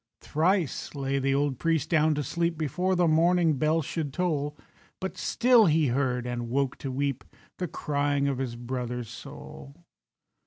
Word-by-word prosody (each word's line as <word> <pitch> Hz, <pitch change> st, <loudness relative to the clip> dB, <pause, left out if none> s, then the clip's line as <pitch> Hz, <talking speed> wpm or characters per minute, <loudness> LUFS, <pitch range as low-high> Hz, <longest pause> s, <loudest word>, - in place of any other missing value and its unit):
Thrice 165 Hz, -2 st, 0 dB
lay 140 Hz, 0 st, -1 dB
the 135 Hz, 0 st, +1 dB
old 140 Hz, -2 st, 0 dB
priest 165 Hz, -4 st, 0 dB
down 155 Hz, -1 st, +3 dB
to 150 Hz, -, -1 dB
sleep 170 Hz, +4 st, -1 dB
Before 180 Hz, +5 st, 0 dB
the 175 Hz, -1 st, +3 dB
morning 165 Hz, -1 st, +3 dB
bell 155 Hz, +1 st, +2 dB
should 150 Hz, 0 st, -3 dB
toll; 150 Hz, -3 st, -1 dB, 0.4 s
But 190 Hz, 0 st, -4 dB
still 240 Hz, -4 st, +4 dB
he 155 Hz, -3 st, +3 dB
heard—and 125 Hz, -2 st, -1 dB
woke 135 Hz, +1 st, 0 dB
to 135 Hz, -, -4 dB
weep— 140 Hz, 0 st, -2 dB, 0.4 s
The 180 Hz, -, -1 dB
crying 145 Hz, -2 st, 0 dB
of 135 Hz, -2 st, -1 dB
his 125 Hz, -3 st, -3 dB
brother's 125 Hz, -1 st, -4 dB
soul. 70 Hz, 0 st, -10 dB
145 Hz, 155 wpm, -27 LUFS, 130-165 Hz, 0.4 s, still